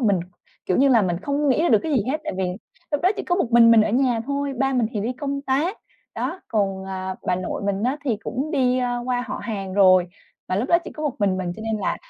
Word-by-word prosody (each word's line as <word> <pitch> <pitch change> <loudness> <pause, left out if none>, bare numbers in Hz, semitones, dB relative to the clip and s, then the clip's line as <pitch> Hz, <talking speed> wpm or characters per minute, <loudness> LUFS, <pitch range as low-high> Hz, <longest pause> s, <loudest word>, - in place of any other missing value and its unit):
mình, 205 -7 +2 0.5
kiểu 185 - +1
như 275 +1 +4
là, 235 -5 +5
mình 175 -2 0
không 285 +3 0
nghĩ 275 +4 +3
ra 345 - +2
được 220 - +5
cái 315 - -2
gì 240 -7 +2
hết. 305 +2 -1
Tại - - -3
vì 190 - +1 0.5
lúc 290 - 0
đó 365 - +4
chỉ - - -3
có 355 - 0
một 270 -11 -1
mình 230 -1 +7
mình 225 -1 +7
ở 215 - 0
nhà 245 -1 +2
thôi, 280 0 -2
ba 270 0 +1
mình 245 -4 +2
thì 210 - -2
đi 230 +5 -2
công 280 +2 -4
tác. 295 +10 0 0.4
Đó, 380 - -3
còn 195 -3 -1
à, 190 0 -4
bà - - +2
nội 185 +2 -4
mình 200 0 -1
á 255 +5 +1
thì 240 -6 0
cũng 260 +7 -4
đi 255 -4 +2 0.2
qua 250 -1 0
họ - - -4
hàng 195 -4 -4
rồi, 185 -3 +5 0.4
và 185 - 0
lúc 240 +7 -1
đó 340 - +5
chỉ - - -7
có 310 - -7
một 290 -4 -1
mình 195 -3 +1
mình, 180 -2 -3
cho 220 - -8
nên 220 -1 -2
là - - -1
240 Hz, 275 wpm, -23 LUFS, 200-280 Hz, 0.5 s, mình